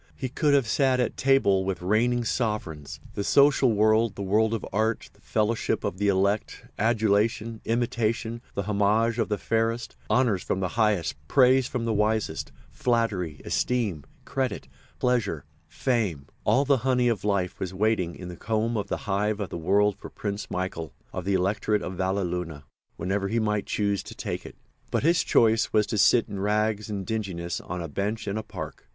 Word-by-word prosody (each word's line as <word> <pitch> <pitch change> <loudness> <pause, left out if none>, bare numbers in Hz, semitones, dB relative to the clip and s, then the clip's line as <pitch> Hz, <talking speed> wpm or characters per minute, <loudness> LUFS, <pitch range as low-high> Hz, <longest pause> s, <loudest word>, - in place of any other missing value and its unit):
He 130 - -4
could 145 +2 +2
have 135 -5 +2
sat 130 +3 +2
at 125 - 0
table 130 -8 +3
with 95 -2 -3
reigning 120 +5 +2
sovereigns. 105 - -2
The 100 - -2
social 140 0 +5
world, 110 +1 +3
the 100 - -4
world 110 +3 +2
of 110 - -5
art, 110 +2 0
the - - -26
fellowship 110 +1 0
of 90 - -3
the 105 - +1
elect, 100 +2 0
adulation, 110 +1 +1
imitation, 115 0 -1
the 100 - -1
homage 105 +3 +2
of 110 - 0
the 105 - 0
fairest, 115 +2 -1
honours 110 -4 +2
from 95 - -2
the 95 -1 -1
highest, 105 -8 +1
praise 130 - +4
from 120 -3 -3
the 115 - 0
wisest, 105 +1 0 0.2
flattery, 105 - -1
esteem, 110 - 0 0.2
credit, 130 -2 -2 0.3
pleasure, 115 - 0 0.2
fame—all 115 - 0
the 140 -1 +4
honey 125 0 +2
of 115 -6 0
life 100 -3 0
was 95 - -3
waiting 95 -3 0
in 90 - -8
the 90 - -7
comb 110 +4 -1
in 105 - 0
the - - -2
hive 105 +1 0
of 100 - -3
the - - -4
world 100 +4 +3
for - - -9
Prince 100 0 -5
Michael, 85 -5 -4 0.2
of 90 - -4
the 100 0 +1
Electorate 100 +3 +1
of 95 - -4
Valleluna, 90 -5 -2 0.3
whenever 100 +3 -1
he 110 +4 -1
might 105 -2 0
choose 100 -2 0
to - - -10
take - - -4
it. - - -12 0.3
But - - 0
his 165 +3 +4
choice 110 -1 +3
was 105 -1 +3
to 105 0 -2
sit 115 +3 +5
in 100 - -6
rags 105 +1 0
and 100 -2 -3
dinginess 95 -6 -3
on 90 0 -5
a - - -4
bench 105 +8 -3
in 100 - -1
a 110 - -1
park. - - -8
105 Hz, 180 wpm, -26 LUFS, 95-115 Hz, 0.3 s, social